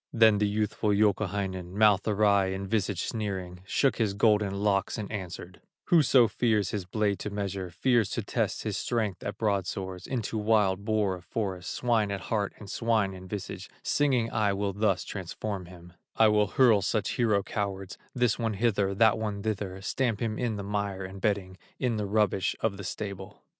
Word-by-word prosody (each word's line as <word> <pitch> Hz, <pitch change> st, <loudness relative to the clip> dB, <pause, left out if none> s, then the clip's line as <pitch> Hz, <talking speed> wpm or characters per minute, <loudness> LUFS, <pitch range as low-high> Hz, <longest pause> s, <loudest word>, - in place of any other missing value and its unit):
Then 110 Hz, -3 st, +5 dB
the 105 Hz, -, +2 dB
youthful 105 Hz, +1 st, -1 dB
Youkahainen, 100 Hz, -3 st, 0 dB
Mouth 105 Hz, -3 st, +4 dB
awry 100 Hz, -2 st, +3 dB
and 95 Hz, +1 st, -3 dB
visage 100 Hz, -3 st, 0 dB
sneering, 95 Hz, -5 st, -4 dB
Shook 135 Hz, +3 st, +2 dB
his 105 Hz, -4 st, 0 dB
golden 105 Hz, -2 st, +3 dB
locks 100 Hz, +1 st, 0 dB
and 105 Hz, -2 st, -5 dB
answered: 90 Hz, -3 st, -7 dB, 0.3 s
"Whoso 135 Hz, -7 st, +6 dB
fears 110 Hz, -2 st, +1 dB
his 100 Hz, -4 st, -3 dB
blade 100 Hz, +1 st, 0 dB
to -, -, -4 dB
measure, 100 Hz, -2 st, -3 dB
Fears 115 Hz, +5 st, +2 dB
to -, -, -1 dB
test -, -, -1 dB
his -, -, -2 dB
strength 110 Hz, -6 st, -1 dB
at 100 Hz, 0 st, -5 dB
broadswords, 95 Hz, -3 st, -2 dB
Into 115 Hz, -4 st, -2 dB
wild 105 Hz, -2 st, +2 dB
boar 105 Hz, -3 st, +1 dB
of 90 Hz, -, -7 dB
the -, -, -28 dB
forest, 95 Hz, -5 st, -3 dB
Swine 115 Hz, -4 st, +1 dB
at 100 Hz, -1 st, -2 dB
heart 105 Hz, -3 st, 0 dB
and 105 Hz, -, -11 dB
swine 110 Hz, -2 st, 0 dB
in 95 Hz, 0 st, -10 dB
visage, 100 Hz, 0 st, -6 dB
Singing 130 Hz, -6 st, +1 dB
I 105 Hz, -2 st, +1 dB
will 100 Hz, 0 st, -1 dB
thus 100 Hz, -2 st, +1 dB
transform 95 Hz, 0 st, -5 dB
him; 90 Hz, -1 st, -13 dB, 0.2 s
I 110 Hz, -1 st, +5 dB
will 105 Hz, -1 st, +3 dB
hurl 115 Hz, -2 st, +4 dB
such 105 Hz, +1 st, 0 dB
hero 110 Hz, -5 st, +2 dB
cowards, 95 Hz, -2 st, -4 dB, 0.2 s
This 125 Hz, -3 st, +2 dB
one 115 Hz, -2 st, 0 dB
hither, 100 Hz, -3 st, +1 dB
that 110 Hz, +2 st, +4 dB
one 105 Hz, -2 st, -3 dB
thither, 100 Hz, -3 st, -3 dB
Stamp 115 Hz, -1 st, 0 dB
him 110 Hz, -2 st, -2 dB
in 120 Hz, -3 st, -1 dB
the 100 Hz, -, -5 dB
mire 100 Hz, -1 st, -2 dB
and 95 Hz, +1 st, -9 dB
bedding, 100 Hz, -3 st, -1 dB, 0.2 s
In 120 Hz, -4 st, 0 dB
the 105 Hz, -1 st, -2 dB
rubbish 105 Hz, -2 st, +1 dB
of 105 Hz, -3 st, 0 dB
the 100 Hz, -, -7 dB
stable." 100 Hz, +1 st, -6 dB
105 Hz, 185 wpm, -28 LUFS, 95-110 Hz, 0.3 s, Whoso